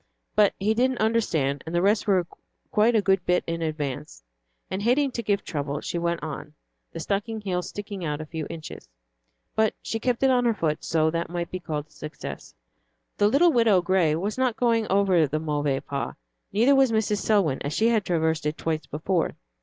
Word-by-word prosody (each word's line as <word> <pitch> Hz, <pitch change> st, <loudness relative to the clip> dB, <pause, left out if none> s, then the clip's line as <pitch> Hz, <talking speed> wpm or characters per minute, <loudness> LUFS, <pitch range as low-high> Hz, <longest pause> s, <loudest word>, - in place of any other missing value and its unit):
But 210 Hz, -2 st, +4 dB
he 210 Hz, +3 st, +1 dB
didn't 255 Hz, +2 st, +1 dB
understand, 165 Hz, -, +1 dB
and 165 Hz, -, -3 dB
the 175 Hz, -, +3 dB
rest 205 Hz, +2 st, +2 dB
were 185 Hz, -3 st, +3 dB, 0.5 s
quite 225 Hz, +3 st, +3 dB
a 215 Hz, -, +3 dB
good 190 Hz, -2 st, +2 dB
bit 180 Hz, 0 st, +3 dB
in 165 Hz, 0 st, -3 dB
advance, 150 Hz, -, -4 dB, 0.4 s
and 190 Hz, -, -3 dB
hating 260 Hz, +5 st, +2 dB
to 235 Hz, -, -3 dB
give 205 Hz, -2 st, 0 dB
trouble, 145 Hz, -2 st, -3 dB
she 170 Hz, -, -3 dB
went 170 Hz, -1 st, -1 dB
on, 150 Hz, 0 st, -6 dB, 0.4 s
the 165 Hz, -, -7 dB
stocking 205 Hz, +6 st, -2 dB
heel 185 Hz, -3 st, -1 dB
sticking 200 Hz, 0 st, -7 dB
out 150 Hz, -2 st, -2 dB
a 155 Hz, -, -5 dB
few 155 Hz, -1 st, -5 dB
inches. 165 Hz, -2 st, -8 dB, 0.7 s
But 220 Hz, 0 st, +2 dB
she 225 Hz, -, -4 dB
kept 245 Hz, +2 st, 0 dB
it 265 Hz, -, +5 dB
on 250 Hz, -1 st, +3 dB
her 230 Hz, -2 st, +2 dB
foot, 155 Hz, -5 st, -1 dB
so 160 Hz, -1 st, +2 dB
that 170 Hz, +1 st, -2 dB
might 175 Hz, 0 st, -4 dB
be 185 Hz, -, -3 dB
called 155 Hz, -4 st, -4 dB
a 155 Hz, -, -34 dB
success. 150 Hz, +1 st, -8 dB, 0.6 s
The 205 Hz, -, +4 dB
little 310 Hz, +10 st, +5 dB
Widow 225 Hz, -, +4 dB
Gray 175 Hz, -4 st, +2 dB
was 205 Hz, +9 st, -3 dB
not 255 Hz, -3 st, +2 dB
going 230 Hz, -2 st, +2 dB
over 190 Hz, -5 st, +3 dB
the 155 Hz, +3 st, -2 dB
Mauvais 145 Hz, -3 st, -1 dB
Pas, 140 Hz, -1 st, -4 dB, 0.4 s
neither 235 Hz, +7 st, +4 dB
was 270 Hz, -3 st, +4 dB
Mrs. 215 Hz, -2 st, +1 dB
Selwyn, 195 Hz, -11 st, +2 dB
as 145 Hz, -, -3 dB
she 220 Hz, +8 st, +2 dB
had 225 Hz, -3 st, +2 dB
traversed 160 Hz, -4 st, 0 dB
it 150 Hz, -, -2 dB
twice 160 Hz, -1 st, -2 dB
before. 165 Hz, +3 st, -1 dB
180 Hz, 200 wpm, -25 LUFS, 155-220 Hz, 0.7 s, it